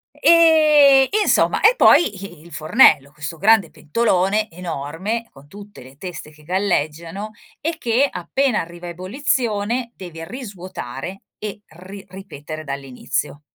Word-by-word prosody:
E 305 Hz, -5 st, +6 dB
e 430 Hz, -, +2 dB
insomma -, -, +2 dB
e 460 Hz, +3 st, +5 dB
poi 220 Hz, -, +5 dB
i 175 Hz, -5 st, -11 dB
il 170 Hz, -, -16 dB
fornello, 155 Hz, -, +4 dB
questo 150 Hz, +2 st, -7 dB
grande 200 Hz, -3 st, +3 dB
pentolone 205 Hz, +3 st, 0 dB
enorme 175 Hz, +7 st, -5 dB
con 135 Hz, +1 st, -18 dB
tutte 205 Hz, 0 st, -13 dB
le 130 Hz, +2 st, -15 dB
teste 175 Hz, -4 st, -8 dB
che 150 Hz, 0 st, -20 dB
galleggiano 175 Hz, +2 st, -2 dB, 0.3 s
e 325 Hz, +1 st, -3 dB
che 250 Hz, +1 st, +1 dB
appena 270 Hz, -5 st, -1 dB
arriva 170 Hz, +1 st, -9 dB
a -, -, -6 dB
ebollizione 230 Hz, -, -2 dB
devi 165 Hz, -3 st, -9 dB
risvuotare 185 Hz, -, -8 dB, 0.2 s
e 210 Hz, -1 st, -6 dB
ri 190 Hz, +4 st, -12 dB
ripetere 155 Hz, -5 st, -9 dB
dall'inizio. 140 Hz, +1 st, -4 dB
190 Hz, 135 wpm, -20 LUFS, 155-230 Hz, 0.3 s, E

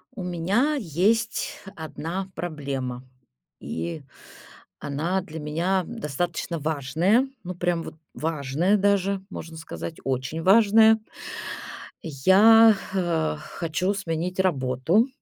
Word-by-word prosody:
У 185 Hz, -, -5 dB
меня 195 Hz, -, +1 dB
есть 215 Hz, -, 0 dB, 0.2 s
1 165 Hz, +4 st, -5 dB
проблема, 140 Hz, -7 st, -4 dB, 0.6 s
и 85 Hz, -, -5 dB, 0.8 s
она 165 Hz, +7 st, -1 dB
для 160 Hz, -3 st, -8 dB
меня 170 Hz, +6 st, 0 dB
достаточно 170 Hz, -3 st, -3 dB
важная. 160 Hz, -, +1 dB, 0.2 s
Ну, 180 Hz, -1 st, -5 dB
прям 175 Hz, -1 st, 0 dB
вот -, -, -9 dB, 0.2 s
важная 160 Hz, +5 st, 0 dB
даже, 200 Hz, -1 st, +1 dB
можно 165 Hz, -4 st, -8 dB
сказать, 160 Hz, 0 st, -7 dB
очень 130 Hz, +4 st, -2 dB
важная. 220 Hz, +3 st, +6 dB, 1.0 s
Я, 205 Hz, +9 st, +6 dB, 0.2 s
э, 170 Hz, -, 0 dB
хочу 175 Hz, -, -2 dB
сменить 180 Hz, -1 st, -3 dB
работу. 155 Hz, -, +2 dB
175 Hz, 100 wpm, -25 LUFS, 150-195 Hz, 1.0 s, важная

